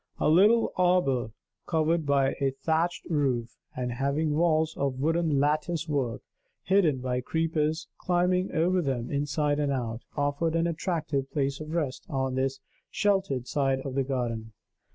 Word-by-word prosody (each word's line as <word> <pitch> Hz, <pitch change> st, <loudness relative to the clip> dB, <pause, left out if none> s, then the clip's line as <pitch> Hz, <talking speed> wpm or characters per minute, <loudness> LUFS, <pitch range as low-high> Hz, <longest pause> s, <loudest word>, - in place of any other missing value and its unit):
A -, -, +2 dB
little 210 Hz, +8 st, +5 dB
arbor 175 Hz, -10 st, +2 dB, 0.4 s
covered 160 Hz, -1 st, +1 dB
by 140 Hz, -1 st, +3 dB
a 135 Hz, -1 st, +2 dB
thatched 160 Hz, +4 st, 0 dB
roof, 130 Hz, -7 st, -1 dB, 0.2 s
and 125 Hz, -1 st, -2 dB
having 140 Hz, +5 st, 0 dB
walls 160 Hz, -1 st, +2 dB
of 135 Hz, -2 st, -2 dB
wooden 160 Hz, 0 st, +1 dB
lattice 155 Hz, +3 st, 0 dB
work, 135 Hz, -6 st, -2 dB, 0.4 s
hidden 175 Hz, -9 st, +2 dB
by 125 Hz, 0 st, -1 dB
creepers 160 Hz, +2 st, -1 dB
climbing 180 Hz, +1 st, +1 dB
over 180 Hz, +3 st, +2 dB
them 130 Hz, -6 st, -2 dB
inside 145 Hz, +1 st, 0 dB
and 145 Hz, -1 st, +1 dB
out, 120 Hz, -3 st, -3 dB, 0.2 s
offered 145 Hz, +3 st, 0 dB
an 165 Hz, 0 st, +2 dB
attractive 155 Hz, -5 st, -2 dB
place 140 Hz, -2 st, -1 dB
of 155 Hz, +1 st, -6 dB
rest 145 Hz, -6 st, -2 dB
on 135 Hz, -2 st, -1 dB
this 135 Hz, +1 st, -1 dB, 0.3 s
sheltered 190 Hz, -, 0 dB
side 135 Hz, -2 st, 0 dB
of 135 Hz, -1 st, -5 dB
the 135 Hz, -, +1 dB
garden. 120 Hz, -4 st, -3 dB
145 Hz, 150 wpm, -28 LUFS, 135-165 Hz, 0.4 s, little